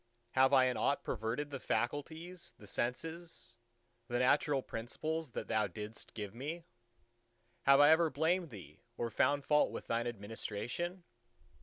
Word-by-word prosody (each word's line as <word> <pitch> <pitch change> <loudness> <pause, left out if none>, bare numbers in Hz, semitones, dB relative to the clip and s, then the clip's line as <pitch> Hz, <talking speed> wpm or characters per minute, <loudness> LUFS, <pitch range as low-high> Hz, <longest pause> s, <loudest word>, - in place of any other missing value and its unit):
Have 130 +1 +5
I 130 -2 +6
in 125 -2 0
aught 140 - +1
perverted 120 +6 -2
the 135 - -4
faculties, 160 +10 -3
the 105 - -13
senses, 160 - -4 0.5
the 120 - -1
natural 135 +2 +3
principles 155 +7 -4
that - - -4
Thou 110 -1 +2
didst 105 +4 -7
give 105 -2 -5
me? 155 +8 -5 1.0
Have 140 0 +8
I 145 +1 +8
ever 160 0 +5
blamed 160 +4 +1
Thee 90 - -11 0.2
or 115 -1 -2
found 140 +5 +2
fault 150 -1 +4
with - - -6
Thine 115 +1 0
administration? 115 - -4
130 Hz, 145 wpm, -35 LUFS, 115-160 Hz, 1.0 s, Have